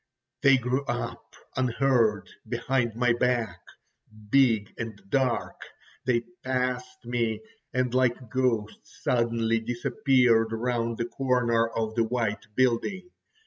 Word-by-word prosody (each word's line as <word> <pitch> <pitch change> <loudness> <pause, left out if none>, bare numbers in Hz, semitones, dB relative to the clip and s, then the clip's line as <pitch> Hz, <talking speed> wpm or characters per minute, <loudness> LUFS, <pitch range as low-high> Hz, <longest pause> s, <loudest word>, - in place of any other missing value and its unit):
They 135 -2 +6
grew 125 +2 -1
up 120 -1 -5 0.2
unheard 120 -5 +2 0.2
behind 125 -4 0
my 120 0 +3
back, 120 -7 0 0.7
big 115 -7 +3
and 115 -3 -5
dark; 130 -3 0 0.4
they 120 -2 +2 0.2
passed 125 -1 -2
me, 115 -2 -1 0.3
and 125 -1 0
like 125 -2 +1
ghosts 125 -5 -2
suddenly 115 -1 +1
disappeared 120 -1 +2
round 115 0 -1
the 115 - -1
corner 120 -3 +1
of 110 -1 -3
the 115 0 +2
white 115 -2 -2
building. 155 - 0
120 Hz, 110 wpm, -27 LUFS, 115-130 Hz, 0.7 s, They